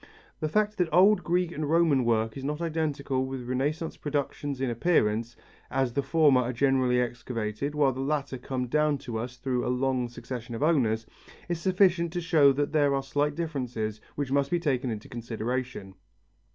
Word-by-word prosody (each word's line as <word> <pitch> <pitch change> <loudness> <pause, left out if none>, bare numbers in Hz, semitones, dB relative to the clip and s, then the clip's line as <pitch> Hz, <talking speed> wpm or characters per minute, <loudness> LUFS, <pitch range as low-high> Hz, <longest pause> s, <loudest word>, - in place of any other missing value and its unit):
The 155 - -1
fact 210 +3 0
that 175 -2 +1
old 195 +6 +5
Greek 175 0 +1
and 150 -3 -3
Roman 160 -5 +3
work 110 -1 +1
is 135 - -7
not 150 +2 -2
identical 150 -5 -1
with 130 -2 -5
Renaissance 145 +6 -2
productions 145 -1 -3
in 135 - 0
appearance, 115 -4 +1 0.3
as 130 -2 0
the 140 - +1
former 145 -4 +4
are 125 +1 -2
generally 130 -1 +2
excavated 120 +2 -3
while 145 -2 +3
the 130 - -7
latter 140 -2 -2
come 125 0 -3
down 150 +3 +2
to 120 -5 -5
us 125 +2 -6
through 125 -1 -1
a - - -1
long 125 -1 0
succession 120 0 -7
of 115 - -2
owners, 115 -9 +2 0.4
is 175 -2 -2
sufficient 185 -3 +3
to 175 - -1
show 160 -5 +5
that 145 +2 -1
there 145 -2 +3
are 135 - -1
slight 145 +2 0
differences 125 -10 -3
which 140 -2 -3
must 140 0 +2
be 175 - +1
taken 135 -6 0
into 110 -2 -5
consideration. 120 -2 -4
135 Hz, 180 wpm, -28 LUFS, 125-155 Hz, 0.4 s, old